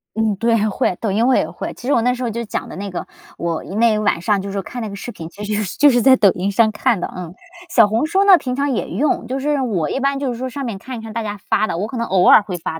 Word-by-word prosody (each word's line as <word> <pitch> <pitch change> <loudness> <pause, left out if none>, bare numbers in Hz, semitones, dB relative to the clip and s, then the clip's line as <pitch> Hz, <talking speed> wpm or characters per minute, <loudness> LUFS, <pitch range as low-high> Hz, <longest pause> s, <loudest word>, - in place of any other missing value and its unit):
嗯， 220 -2 +1
对， 230 -1 +2
会， 190 -3 -1
抖 215 -4 -1
音 225 +5 +2
我 260 - +4
也 - - +1
会。 - - -6
其 245 - -12
实 285 - +1
我 235 - +3
那 250 +2 +2
时 250 0 -5
候 235 - -1
就 235 +2 -4
讲 210 - -4
的 - - -9
那 200 +1 -5
个 180 - -5 0.3
我 170 -1 -3
因 195 - -7
为 225 -2 +3
晚 205 -5 +1
上 200 +2 0
就 200 - -6
是 - - -6
说 200 - -2
看 245 +4 -7
那 220 - -4
个 200 - -7
视 240 +4 -7
频， 165 -5 -9
其 205 +4 -10
实 210 0 -1
就 290 - +6
就 - - +4
是 245 - +3
在 260 +2 +6
抖 200 -7 +4
音 190 +4 -2
上 220 +2 +3
看 215 -1 0
的， - - -4
嗯。 180 -2 -7 0.4
小 225 -4 +6
红 225 +8 0
书 380 +5 +2
呢 390 -3 +7
平 255 -4 -4
常 280 +1 0
也 240 - -2
用， 270 - 0
就 265 +2 -3
是 290 +1 0
我 185 - -1
一 - - -2
般 275 0 0
就 275 -3 -2
是 235 - -6
说 260 +1 -4
上 280 +3 -6
面 225 -5 -4
看 250 +5 -8
一 - - -7
看 225 -1 -8
大 230 0 -3
家 205 -1 -5
发 215 - +2
的， 170 - -3
我 205 +5 -2
可 250 - -6
能 235 - -1
偶 185 -3 +2
尔 - - +8
会 190 -4 -5
发， 160 -1 -5
220 Hz, 355 characters per minute, -19 LUFS, 200-250 Hz, 0.4 s, 尔